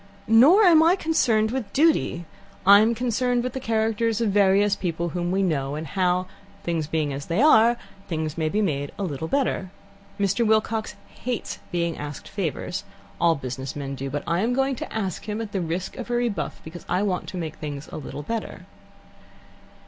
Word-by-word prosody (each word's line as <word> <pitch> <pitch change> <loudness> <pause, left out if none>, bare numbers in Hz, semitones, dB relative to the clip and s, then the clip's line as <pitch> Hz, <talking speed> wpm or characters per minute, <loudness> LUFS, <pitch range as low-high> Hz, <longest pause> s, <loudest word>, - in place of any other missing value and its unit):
"Nor 270 - +7
am 335 -5 +7
I 335 +3 +5
concerned 235 - +2
with 255 -4 -3
duty. 290 - +2 0.4
I'm 210 +4 +7
concerned 245 +1 0
with 250 -1 -3
the 265 - -3
characters 225 -1 0
of 225 -3 +1
various 200 0 +4
people 170 -2 -2
whom 175 +1 -2
we 190 +2 +1
know, 145 -5 -1
and 155 +1 -4
how, 180 +2 +1 0.4
things 165 -3 -1
being 155 -2 -1
as 140 +2 -6
they 170 +4 0
are, 240 -5 +6 0.3
things 160 -2 -3
may 160 -1 0
be 210 +5 +1
made 145 -6 -1
a 200 - -3
little 160 -3 -3
better. 255 -6 0 0.5
Mr. 200 +4 +1
Wilcox 220 0 +1
hates 245 -2 -5
being 170 -1 -1
asked 145 -1 -7
favours: - - -3 0.4
all 170 -1 +4
business 130 -1 -5
men 140 -1 -4
do. 135 0 -5
But 145 +1 -3
I 170 +1 0
am 230 +5 +1
going 270 +1 +1
to - - -6
ask 195 -6 -3
him, 210 +1 -2
at 225 -2 -5
the 195 - -1
risk 175 +2 -3
of 250 -2 -6
a - - -1
rebuff, 240 -4 -2
because 170 +2 -9
I 180 +3 +1
want 185 -3 -1
to 185 - -6
make 160 -3 -5
things 145 -1 -6
a - - -7
little 145 0 -7
better." 230 +7 -5
195 Hz, 190 wpm, -24 LUFS, 160-230 Hz, 0.5 s, Nor